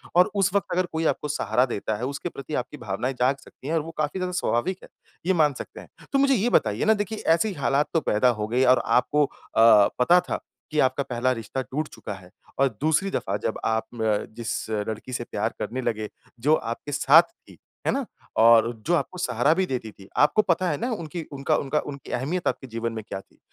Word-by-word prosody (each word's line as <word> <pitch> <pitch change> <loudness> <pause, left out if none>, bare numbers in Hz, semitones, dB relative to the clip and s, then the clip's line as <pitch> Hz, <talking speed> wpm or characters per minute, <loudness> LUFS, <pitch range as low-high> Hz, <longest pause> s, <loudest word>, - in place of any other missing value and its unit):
और 180 +3 +5
उस 195 -1 +3
वक़्त 200 - +1
अगर 185 0 +2
कोई 160 0 -1
आपको 150 - -5
सहारा 125 -3 +1
देता 110 -3 -3
है, 125 - -3
उसके 140 +5 -4
प्रति 145 +1 -9
आपकी 150 - -11
भावनाएँ 120 +3 -3
जाग 130 +3 +3
सकती 135 - -13
है, 160 - -1
और 160 - +2
वो 165 - -7
काफ़ी 155 +5 -1
ज़्यादा 180 0 -2
स्वाभाविक 180 +11 0
है, - - -13 0.4
ये 190 - +3
मान 150 -4 +3
सकते - - -8
हैं। - - -15 0.2
तो 275 - +4
मुझे 275 0 +4
ये 230 +3 +1
बताइए 105 - +2
ना, 220 - +6
देखिए 210 +1 -3 0.2
ऐसी 200 +4 -1
हालात 140 0 +1
तो 165 - +4
पैदा 115 +4 +3
हो 105 - -1
गई 125 +3 +2
और - - +1
आपको 145 +4 +3
अ, - - -10 0.7
पता 175 +8 +6
था - - -1 0.3
कि 155 - 0
आपका 130 +2 +2
पहला 125 +1 0
रिश्ता 120 +2 -3
टूट 150 +4 -3
चुका 105 - -7
है, 95 -2 -12 0.3
और 135 -1 +4
दूसरी 160 +6 +2
दफ़ा 100 +2 -1
जब - - -3
आप 110 0 0
अ, 110 -2 +1
जिस 120 -1 -3 0.2
लड़की 110 +4 -5
से 120 - -2
प्यार - - -1
करने 130 +2 -3
लगे, 110 -3 -2 0.3
जो 150 +6 +4
आपके 115 +4 -5
साथ 150 +4 +7
थी, 335 - -20 0.3
है - - +4
ना, 275 -2 -1 0.3
और 115 0 +6 0.2
जो 175 - +2
आपको 170 +4 -2
सहारा 160 -4 +2
भी 190 +2 +1
देती 125 -7 -4
थी। 95 -1 -16
आपको 150 +9 +5
पता 185 -2 +1
है 145 - -1
ना 245 - -1
उनकी 170 -3 -5
उनका 140 +3 0
उनका 145 +2 0
उनकी 140 -2 -8
अहमियत 155 +9 -2
आपके 130 - -2
जीवन 115 0 -3
में 110 - -5
क्या 95 - -5
थी। - - -31
140 Hz, 225 wpm, -25 LUFS, 120-170 Hz, 0.7 s, साथ